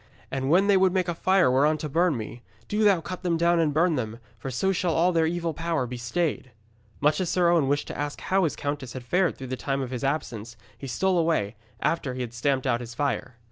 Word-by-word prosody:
And 135 0 -2
when 180 +5 +5
they 200 -1 +4
would 185 -1 +3
make 185 -1 +1
a 175 - 0
fire 185 -4 +3
whereon 145 +4 +3
to 155 - -4
burn 165 0 +2
me, 115 +2 -7 0.3
do 210 +1 0
thou 195 -5 +4
cut 185 +3 -6
them 175 -2 0
down 170 +1 +3
and 160 -2 +2
burn 160 +1 +2
them, 110 -2 -3 0.2
for 135 - -5
so 160 +10 0
shall 180 -2 0
all 175 +2 +3
their 165 -2 +2
evil 170 0 -2
power 165 -3 -1
be 125 +1 -6
stayed.' 140 +3 -2 0.5
Much 150 +5 +3
as 180 - -1
Sir 175 -2 +3
Owen 165 -5 +3
wished 145 +1 0
to - - -5
ask 145 0 -4
how 190 0 +1
his 155 - -1
countess 145 -4 -4
had 130 - -7
fared 180 +8 +1
through 135 - -7
the 130 0 -3
time 135 +1 -2
of 130 - -6
his 125 +1 -4
absence, 120 -5 -3 0.2
he 135 - -8
stole 180 +8 +1
away, 155 -11 0 0.3
after 140 -6 -1
he 130 - -4
had 120 -2 -5
stamped 130 +2 0
out 120 -2 +1
his 120 0 -8
fire. 130 -2 -2
150 Hz, 250 wpm, -26 LUFS, 130-175 Hz, 0.5 s, when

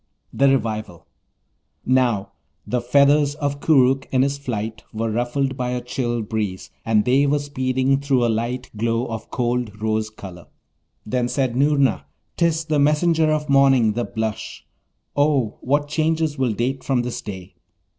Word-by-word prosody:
THE 140 0 +4
REVIVAL 110 -9 -2 0.8
Now, 125 -6 +1 0.3
the 125 -1 -1
feathers 140 +3 +3
of 145 -2 -3
Koorookh 135 -3 +3
in 130 -1 +2
his 140 +1 -1
flight 110 -4 -4
were 110 +1 -2
ruffled 125 +4 -1
by 125 -2 -2
a 125 - -1
chill 120 -1 -2
breeze, 105 -3 -4
and 110 -2 +2
they 135 +3 +3
were 145 +1 +2
speeding 130 -1 0
through 135 -3 +1
a - - +2
light 120 +3 -2
glow 115 +2 0
of 115 -2 -6
cold 120 -4 -2
rose 110 0 -1
colour. 95 -5 -11 0.6
Then 120 +3 0
said 130 -2 -1
Noorna, 140 - +2 0.3
''Tis 165 -1 +1
the 155 -2 0
messenger 155 +2 +3
of 150 -1 -1
morning, 135 -6 +4
the 120 +2 -1
blush. 110 +1 -5 0.5
Oh, 145 -6 +1
what 145 +3 0
changes 155 0 0
will 130 -5 0
date 130 +5 -2
from 130 -3 0
this 125 -1 -4
day!' 95 -2 -8
125 Hz, 155 wpm, -22 LUFS, 115-140 Hz, 0.8 s, THE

